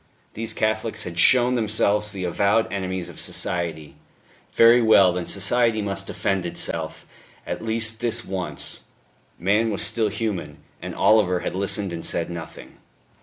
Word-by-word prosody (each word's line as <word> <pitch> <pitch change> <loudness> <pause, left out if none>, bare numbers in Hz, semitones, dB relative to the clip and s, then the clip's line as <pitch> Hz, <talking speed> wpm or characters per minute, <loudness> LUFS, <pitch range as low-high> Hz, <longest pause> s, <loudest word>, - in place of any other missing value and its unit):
These 115 +1 -3
Catholics 110 +1 -1
had 85 -1 -5
shown 125 -1 +5
themselves 105 -2 0
the 95 -2 -6
avowed 100 +5 +1
enemies 95 -2 -3
of - - -10
society; 85 -4 -3 0.5
very 115 +1 +6
well, 100 -5 +5
then 90 -1 -4
society 115 +2 +2
must 100 -1 -3
defend 95 -2 -1
itself, 85 - -4 0.4
at - - -5
least 110 0 0
this 120 -1 0
once. 95 -2 -5 0.6
Man 105 +5 +1
was 100 - 0
still 110 -2 0
human. 100 -8 -4 0.2
And - - -6
Oliver 95 -5 +3
had - - -3
listened 100 0 -2
and 85 - -6
said 85 0 -2
nothing. 85 -1 -9
100 Hz, 145 wpm, -23 LUFS, 90-110 Hz, 0.6 s, very